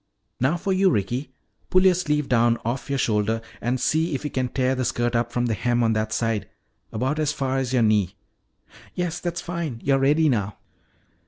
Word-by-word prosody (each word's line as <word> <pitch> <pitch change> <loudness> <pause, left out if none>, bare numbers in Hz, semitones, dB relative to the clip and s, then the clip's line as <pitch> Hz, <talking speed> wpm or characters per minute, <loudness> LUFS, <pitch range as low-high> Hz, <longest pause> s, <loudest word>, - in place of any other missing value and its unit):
Now 135 +7 +2
for 190 +3 -1
you, 190 0 +4
Ricky. 120 - -1 0.4
Pull 185 +1 +4
your 185 - +7
sleeve 150 -5 0
down 120 -1 +3
off 125 +4 -3
your 140 - 0
shoulder 110 -2 +1 0.2
and 125 +2 0
see 160 +4 +1
if 135 - -4
you 150 - -3
can 130 -1 -1
tear 130 +1 +1
the 130 0 -1
skirt 120 -1 0
up 120 0 0
from 120 0 0
the 115 - 0
hem 120 +3 +1
on 115 -1 +2
that 110 0 -1
side 115 -2 -1 0.4
about 130 +7 -1
as 150 -1 +1
far 135 -2 -1
as 130 -2 -2
your 125 -3 +3
knee. 105 -3 +2 0.8
Yes, 175 -1 -2
that's 175 -1 -3
fine. 170 -8 -4
You're 135 -1 +3
ready 150 +4 +3
now." 105 -7 0
130 Hz, 200 wpm, -24 LUFS, 115-150 Hz, 0.8 s, your